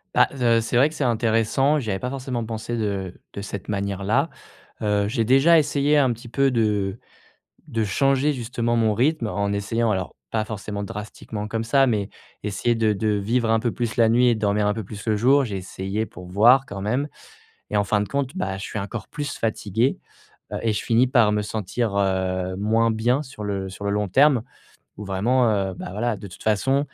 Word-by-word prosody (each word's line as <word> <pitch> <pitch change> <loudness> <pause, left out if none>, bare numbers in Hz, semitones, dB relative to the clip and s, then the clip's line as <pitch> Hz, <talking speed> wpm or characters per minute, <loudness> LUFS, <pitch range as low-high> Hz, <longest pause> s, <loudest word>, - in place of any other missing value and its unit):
Bah - - +6
z 135 -2 -5
heu, 115 -1 +4
c'est 115 +2 -1
vrai 135 +5 +5
que 155 - -11
c'est 145 - -2
intéressant, 120 +4 +2
j'y 115 -6 -4
avais 95 - 0
pas 125 +6 -4
forcément 130 -3 -3
pensé 115 +1 -4
de 100 -4 -3
de 100 - -5
cette 100 -1 -7
manière 100 -1 -2
là, 130 +11 +2 0.5
heu. 105 -1 +1
J'ai 115 +1 0
déjà 135 +8 +6
essayé 150 -1 +2
un 130 -4 +3
petit 120 +2 -12
peu 135 +2 +2
de 105 -3 0 0.7
de 115 -6 -1
changer, 135 +7 +2
justement, 120 -2 -2
mon 110 -2 +2
rythme 125 +2 +1
en 100 -1 -1
essayant, 110 +3 0
alors 95 -4 -2
pas 110 -1 -1
forcément 105 -2 -5
drastiquement 105 +1 -6
comme 115 +1 -2
ça, 135 +4 +3
mais 105 -5 0 0.3
essayer 105 +3 0
de 110 -2 +2
de 105 +2 -2
vivre 110 +3 0
un 115 0 +3
peu 120 +1 -1
plus 120 -1 -3
la 115 -2 +4
nuit 120 +2 +4
et 120 - +4
dormir 105 -1 +1
un 105 - +1
peu 110 - -4
plus 105 +3 -9
le 110 - +3
jour. 135 +6 +4
J'ai 105 -6 -3
essayé, 95 +3 -3
pour 90 -3 -11
voir, 120 +9 +5
quand 100 -3 -6
même 125 +8 0 0.6
et - - 0
en 105 - +3
fin 105 +1 +1
de 105 - -2
compte, 140 0 -2
bah, 95 - -2
je 95 - -7
suis 105 - -5
encore 100 +3 -5
plus 145 -1 -5
fatigué. 110 +2 0 0.5
Heu - - -2
et 115 - +1
je - - -2
finis 115 +2 +3
par 120 -5 +4
me 105 0 +1
sentir, 105 +1 -2
heu, 95 -1 0
moins 110 +3 +2
bien 120 +6 +1
sur 130 -6 -10
le 100 -2 -3
sur 100 +2 -9
le - - +1
long 105 0 0
terme, 135 +4 +4 0.6
ou 105 - -6
vraiment, 120 +7 +2
heu, 100 -3 0
bah, - - -7
voilà, 110 +2 -1
de 100 - -9
toute 90 - -12
façon, 130 +6 +2
110 Hz, 215 wpm, -23 LUFS, 100-125 Hz, 0.7 s, Bah